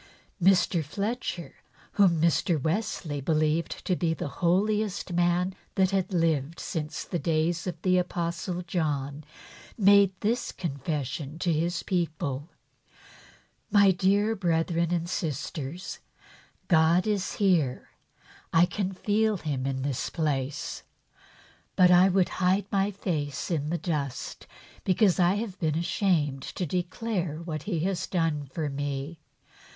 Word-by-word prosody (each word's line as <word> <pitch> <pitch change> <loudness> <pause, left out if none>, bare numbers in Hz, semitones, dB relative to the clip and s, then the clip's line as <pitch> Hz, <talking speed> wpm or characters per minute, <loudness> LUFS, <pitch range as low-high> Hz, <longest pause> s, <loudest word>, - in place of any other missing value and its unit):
Mr. 180 -2 +4
Fletcher, 195 - -3 0.4
whom 185 -5 +4
Mr. 165 0 +2
Wesley 160 - -2
believed 155 +3 0
to 185 - +1
be 165 -2 0
the - - -4
holiest 200 +2 +1
man 175 +2 +2 0.2
that 190 0 +3
had 195 0 0
lived 165 -3 0
since 155 -4 -4
the 175 - -3
days 165 +2 0
of 175 -3 -4
the 185 -1 +4
Apostle 175 0 -3
John, 150 -5 -2 0.5
made 200 -2 +6
this 235 +4 0
confession 145 -1 -4
to 170 0 +1
his 170 +3 -1
people: 155 -5 -2 0.6
" - - -23 0.3
My 200 -2 +6
dear 200 +4 +2
brethren 170 -2 0
and 170 -1 0
sisters, 160 0 -4 0.7
God 170 +1 +4
is 205 -3 -1
here, 170 -11 +1 0.6
I 165 +2 +6
feel 205 +3 0
Him 140 -6 -3
in 130 -1 -2
this 135 -3 -2
place; 145 -4 -2 0.9
but 180 -1 +6
I 180 +2 +7
would 185 -1 +2
hide 185 +2 +3
my 195 0 +2
face 155 -7 -3
in 150 -3 -1
the 170 - 0
dust, 150 -7 -4 0.4
because 190 0 +3
I 180 +2 +4
have 205 -2 -4
been 155 -3 0
ashamed 165 -6 +1
to 180 - -4
declare 180 0 -2
what 155 -3 -4
He 170 -6 0
has 185 +1 -1
done 160 -5 0
for 150 +3 -3
me. 145 +2 -4
170 Hz, 130 wpm, -27 LUFS, 155-190 Hz, 0.9 s, I